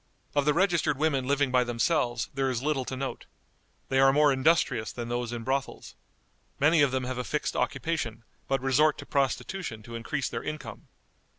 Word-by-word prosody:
Of 145 -1 +2
the 150 - +4
registered 175 -7 +2
women 140 -4 +1
living 140 -1 +2
by 125 -1 +4
themselves 120 0 0
there 135 -1 0
is 125 -1 -2
little 145 -3 0
to 130 - -5
note. 135 0 -5 0.6
They 135 - +2
are 135 0 +6
more 145 0 +4
industrious 130 -5 +2
than 120 -1 -6
those 120 0 -2
in 120 -1 -5
brothels. 135 +2 -3 0.7
Many 155 +2 +4
of 140 - +5
them 130 0 -1
have 125 0 -4
a - - -1
fixed 150 +4 -2
occupation, 120 -9 -2 0.2
but 135 -1 0
resort 145 +3 +3
to - - -8
prostitution 140 - -2
to 115 - -10
increase 120 +4 -2
their 115 - -4
income. 150 0 -7
135 Hz, 185 wpm, -28 LUFS, 125-150 Hz, 0.7 s, are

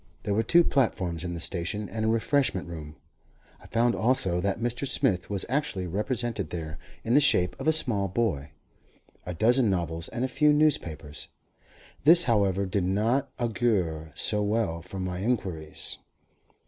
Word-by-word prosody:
There 105 - -1
were 110 - +2
two 170 +10 +5
platforms 95 - 0
in 85 -1 -4
the - - -5
station, 95 +5 -2
and 110 +5 -4
a - - +1
refreshment 115 -4 +1
room. 80 -3 -8 0.7
I - - -14
found 120 +1 +2
also 105 -8 +1
that 100 +1 0
Mr. 120 +4 -2
Smith 105 -11 0
was 100 -2 -2
actually 130 -8 -1
represented 110 - -2
there, 80 -2 -6 0.2
in 115 - 0
the 145 - +6
shape 90 -10 +3
of - - -4
a - - +6
small 120 -11 0
boy, 95 -8 -1 0.8
a 90 - -4
dozen 120 +4 +3
novels, 85 -3 -1
and 120 - -2
a - - 0
few 150 +3 +3
newspapers. 85 - 0 0.8
This, 170 +5 +8
however, 100 - +2
did 95 0 -1
not 115 +9 +1
augur 100 -10 -1
so 105 -2 0
well 105 -5 -1
for 95 +3 -8
my 90 -1 -3
inquiries. 95 -8 -3
100 Hz, 160 wpm, -27 LUFS, 90-120 Hz, 0.8 s, This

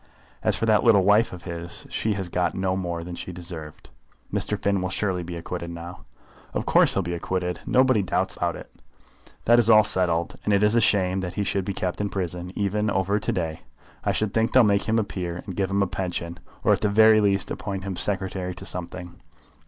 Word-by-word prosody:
As - - +2
for - - -1
that 110 -2 +3
little 110 -6 +5
wife 105 +4 +4
of 90 -1 -9
his, 85 -1 -5
she 110 - 0
has 95 -2 -4
got 85 -1 -1
no 95 0 0
more 85 -3 -3
than 90 +1 -7
she 90 - -6
deserved." 85 -3 -8 0.4
"Mr. - - -1
Finn 100 -1 +1
will 95 - -2
surely 95 -2 -1
be 85 0 -6
acquitted 85 +1 -5
now." 85 +1 -9 0.5
"Of - - -1
course - - +4
he'll 95 - +1
be 85 0 -3
acquitted. 90 +1 -2
Nobody 130 -4 +4
doubts 95 - -1
about - - -1
it. - - -11 0.7
That 120 +1 +6
is 115 -1 +3
all 110 -1 +8
settled, 85 -4 0
and 105 - +1
it 100 - +2
is 105 +2 +4
a 115 - +4
shame 95 -3 +2
that 90 -1 -5
he 105 - 0
should 95 -1 -1
be 100 - -2
kept 90 +2 -2
in 100 - -1
prison 90 -2 -4
even 105 +1 0
over 100 +1 +1
to - - -2
day. 80 -3 -3 0.4
I - - +1
should 110 -2 -1
think 115 0 +1
they'll 130 - +7
make 100 -2 +2
him 110 - +3
a 110 - +2
peer, 90 -3 -5
and 95 -4 -6
give 95 0 0
him 100 0 +2
a - - -1
pension, 85 -3 -4 0.2
or - - +5
at - - -1
the 105 - +2
very 110 +1 +6
least 100 -2 +1
appoint 95 -2 -4
him 95 -1 -4
secretary 95 -2 -1
to 95 - -9
something. 90 -1 -7
95 Hz, 225 wpm, -25 LUFS, 90-105 Hz, 0.7 s, all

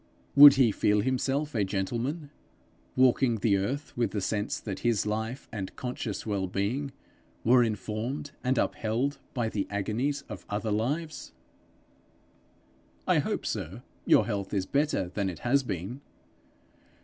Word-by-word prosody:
Would 145 0 +11
he 125 -5 +4
feel 105 +1 +2
himself 135 +5 -1
a 105 -4 +1
gentleman 120 - -3 0.6
walking 130 -1 +4
the 105 -1 +2
earth 135 +10 -3
with 120 -1 +1
the 105 - 0
sense 105 +1 -2
that 100 -4 -5
his 115 -4 +1
life 110 +4 -3
and 100 -5 -5
conscious 125 -4 -4
well 100 -3 -1
being 115 +10 -2 0.5
were 120 +2 +6
informed 110 +6 -3
and 130 0 +1
upheld 120 +8 0 0.2
by 120 -3 0
the 105 -3 -2
agonies 120 +8 -1
of 105 -6 -8
other 105 +1 -2
lives? 145 +10 -2 1.7
'I - - +4
hope, - - -2
sir, - - -4 0.2
your 105 - +6
health 100 -2 -3
is 95 -2 0
better 140 - 0
than 95 +1 -2
it 85 - -6
has 140 +3 +4
been?' 110 +3 -5
115 Hz, 140 wpm, -28 LUFS, 105-135 Hz, 1.7 s, Would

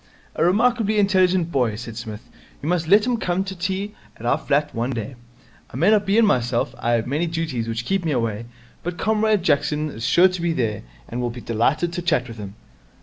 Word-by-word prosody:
'A - - +1
remarkably 215 +3 +2
intelligent 185 -4 +3
boy,' 125 -7 +1
said 115 0 -7
Psmith. 115 0 -7 0.3
'You 145 - -6
must 170 -1 0
let 205 +5 +5
him 245 -1 +1
come 185 -3 -1
to 190 0 -6
tea 190 +3 -3 0.2
at 115 - -9
our 120 - +2
flat 145 +1 0
one 120 +2 -1
day. 125 0 -4 0.6
I - - -7
may 170 +9 +4
not 210 -2 +3
be 200 +2 +3
in 230 - +6
myself 120 - +1
I 120 - 0
have 115 -1 +1
many 150 +7 -1
duties 160 -8 -2
which 115 +1 -3
keep 195 +5 0
me 160 - 0
away 115 -4 -1 0.4
but 175 0 -4
Comrade 215 0 +1
Jackson 150 -1 +1
is 115 - -8
sure 175 +9 +5
to 185 -2 -4
be 170 -1 +1
there, 115 -8 -1 0.3
and 120 +1 -4
will 120 - -1
be 120 +1 -7
delighted 130 +10 0
to 175 - -3
chat 160 -8 +1
with 115 -1 -9
him.' 100 -1 -8
160 Hz, 220 wpm, -22 LUFS, 120-190 Hz, 0.6 s, in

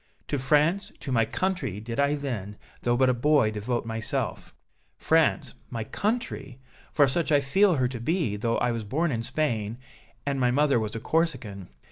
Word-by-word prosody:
To 145 - 0
France, 150 +8 +2
to 135 - -5
my 115 -3 +3
country, 135 - -2
did 115 +4 -5
I 140 +1 +3
then, 110 -8 -4 0.2
though 120 0 +1
but 130 0 +4
a 125 - +4
boy, 135 -2 +3
devote 110 +3 -2
myself 115 0 -2 0.5
France, - - +2 0.2
my 115 -1 -3
country! 200 - -3 0.3
for 145 -2 +4
such 160 +5 +1
I 145 - +6
feel 180 +7 +3
her 130 -3 +2
to 125 -2 -6
be, 150 - 0
though 115 +3 0
I 120 0 +1
was 115 -1 -3
born 155 +10 0
in 115 -3 -1
Spain 115 -4 -1 0.5
and 140 -1 -1
my 125 -1 +3
mother 140 0 +3
was 110 0 -3
a - - -2
Corsican. 120 - -1
130 Hz, 180 wpm, -27 LUFS, 115-150 Hz, 0.5 s, I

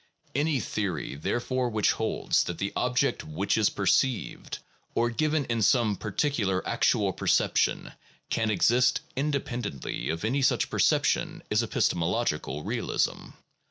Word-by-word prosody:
Any 145 0 +1
theory 100 -8 -3
therefore 120 - -1
which 110 -3 +2
holds - - 0
that 85 - -4
the 100 - -3
object 125 +2 +1
which 80 +6 -1
is 110 -2 +3
perceived, 120 +5 0 0.4
or 120 +1 +2
given 155 +3 0
in 115 -2 -1
some 110 -2 +3
particular 105 -2 -1
actual - - +2
perception, - - +1 0.4
can 110 -1 +1
exist 120 +4 +3
independently 125 - -3
of 80 +5 -2
any 135 +5 +1
such 130 - +2
perception - - +1
is - - +3
epistemological 75 -4 -1
realism. - - -1
115 Hz, 125 wpm, -27 LUFS, 100-130 Hz, 0.4 s, is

